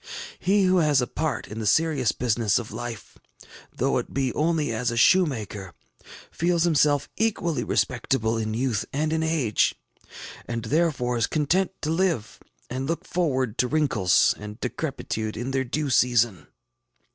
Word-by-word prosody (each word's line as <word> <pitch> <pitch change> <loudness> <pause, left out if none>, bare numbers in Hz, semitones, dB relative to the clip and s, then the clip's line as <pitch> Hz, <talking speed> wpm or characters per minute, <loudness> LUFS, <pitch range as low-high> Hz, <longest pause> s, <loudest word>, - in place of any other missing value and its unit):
He 195 +2 +2
who 185 0 +3
has 150 -5 +3
a 125 - +1
part 155 +4 -3
in 110 - -7
the 110 - -2
serious 145 -3 +2
business 115 -3 +1
of 120 -3 -5
life, 120 -3 -7 0.5
though - - 0
it - - -8
be 135 -2 0
only 155 -3 0
as 115 +2 -1
a 120 - -3
shoemaker, 110 - +2 0.6
feels 170 0 +1
himself 145 -4 +3
equally 205 -7 0
respectable 115 -2 0
in 110 -1 -2
youth 120 -3 0
and 155 +2 -1
in 160 - 0
age, 160 -9 +1 0.7
and 115 -1 -4
therefore 140 -6 +1
is 115 - +1
content 170 +5 +1
to 155 - 0
live 165 - -1 0.3
and 130 +2 -4
look 165 +1 -3
forward 130 -10 -1
to 125 - +3
wrinkles 140 - +3
and 105 +2 -8
decrepitude 125 -5 -4
in 120 +4 -3
their 135 0 0
due 145 +3 -2
season. 120 - +2
135 Hz, 155 wpm, -25 LUFS, 115-160 Hz, 0.7 s, who